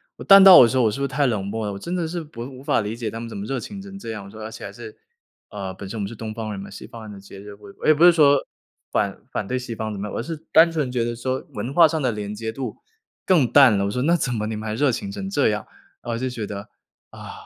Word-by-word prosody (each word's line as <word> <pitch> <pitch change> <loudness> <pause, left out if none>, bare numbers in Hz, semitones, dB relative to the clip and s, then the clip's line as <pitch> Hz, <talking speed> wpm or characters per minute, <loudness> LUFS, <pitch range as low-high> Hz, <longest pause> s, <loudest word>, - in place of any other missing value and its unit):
我 - - -10
淡 195 0 +9
到 190 -2 +11
有 120 - +8
时 130 - -1
候 130 - +4
我 110 - +4
是 120 - -5
不 - - 0
是 - - +1
太 140 +2 0
冷 105 -5 -1
漠 110 +2 -3
了？ 100 - -3
我 - - -6
真 170 - -5
的 175 -3 -1
是 170 +1 -4
不 150 -6 -11
无 130 0 -10
法 - - +1
理 105 +2 -4
解 115 -2 -4
他 115 - -6
们 115 - -6
怎 115 - -9
么 100 - -5
热 135 +3 -3
情 200 - -8
成 195 0 -10
这 115 - -6
样。 105 -2 -6
我 - - -11
说， 110 - -11
而 110 - -6
且 115 - -10
还 - - -7
是， 425 +1 -11 0.5
呃， 95 -2 -6
本 95 +1 -9
身 115 - -6
我 - - -2
们 100 - -2
是 115 - -9
东 110 0 -6
方 110 0 -5
人 100 - -6
嘛， 100 - -8
西 - - -10
方 115 - -11
人 110 - -9
的 100 - -10
节 100 0 -13
日， 105 0 -10
我 100 -1 -14
我 - - -5
也 155 - +7
不 160 +4 +4
是 175 - +9
说， 145 -4 +5 0.5
反 100 -2 -1
反 - - -2
对 130 +3 -1
西 125 -2 -6
方 110 0 -4
怎 100 - -6
么 100 - -4
样， - - -7
我 - - -2
是 160 +3 -5 0.2
单 165 +1 +7
纯 150 -5 -1
觉 125 -2 -1
得 120 0 -2
说， 130 +2 -3
文 115 +6 -4
化 170 +2 +7
上 160 -1 -2
的 130 -3 +1
连 105 -1 -5
接 110 +1 -5
度 130 +1 -5 0.5
更 160 -10 +3
淡 130 -7 +7
了。 100 - 0
我 100 - -2
说， 125 - -2
“那 170 +4 +3
怎 130 -7 -1
么 105 -2 -2
你 110 - -3
们 110 +1 -6
还 110 - -3
热 140 +5 +2
情 200 - -4
成 200 -1 -5
这 145 - +2
样？” 105 -1 -2 0.4
啊， 120 - -5
我 - - -2
就 130 +2 -2
觉 115 -4 -5
得， 100 0 -7 0.4
啊， - - -10
115 Hz, 355 characters per minute, -22 LUFS, 105-145 Hz, 0.5 s, 到